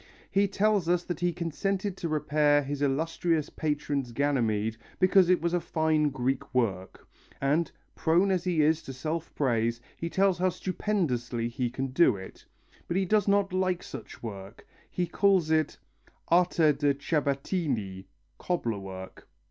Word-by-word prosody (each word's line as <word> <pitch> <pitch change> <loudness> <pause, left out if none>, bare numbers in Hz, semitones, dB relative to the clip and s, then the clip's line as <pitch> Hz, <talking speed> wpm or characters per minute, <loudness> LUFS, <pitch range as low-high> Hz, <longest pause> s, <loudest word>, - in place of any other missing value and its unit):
He 200 +1 +3
tells 200 -2 +1
us 175 0 +2
that 175 -3 -4
he 175 0 +1
consented 185 +4 -2
to 170 - -3
repair 150 -1 +2
his 140 +1 -4
illustrious 155 +3 0
patron's 145 -4 -2
Ganymede 115 -5 0 0.2
because 185 -1 +5
it 180 -3 +3
was 170 0 0
a 175 - +3
fine 155 -2 +1
Greek 135 +1 -2
work, 95 -7 -1 0.3
and, 150 +5 +1 0.2
prone 175 +5 +2
as 180 -2 +1
he 175 -5 +2
is 160 +2 +3
to 135 - -8
self 155 +5 -4
praise, 115 -4 +1 0.2
he 170 - -4
tells 190 -1 +2
how 185 +1 +3
stupendously 140 - -2
he 120 0 -2
can 135 +2 -3
do 130 -3 +4
it; 95 -1 -10 0.4
but 170 - -1
he 190 - +2
does 210 +1 +2
not 200 -1 +2
like 185 -1 0
such - - -9
work, 100 -3 -8 0.2
he 180 - -1
calls 185 -3 +2
it 155 -2 +1 0.5
arte 170 -3 +4
da 145 0 +1
Ciabattini 140 - -2 0.3
(cobbler 120 - -1
work). 95 -1 -9
155 Hz, 155 wpm, -28 LUFS, 130-180 Hz, 0.5 s, because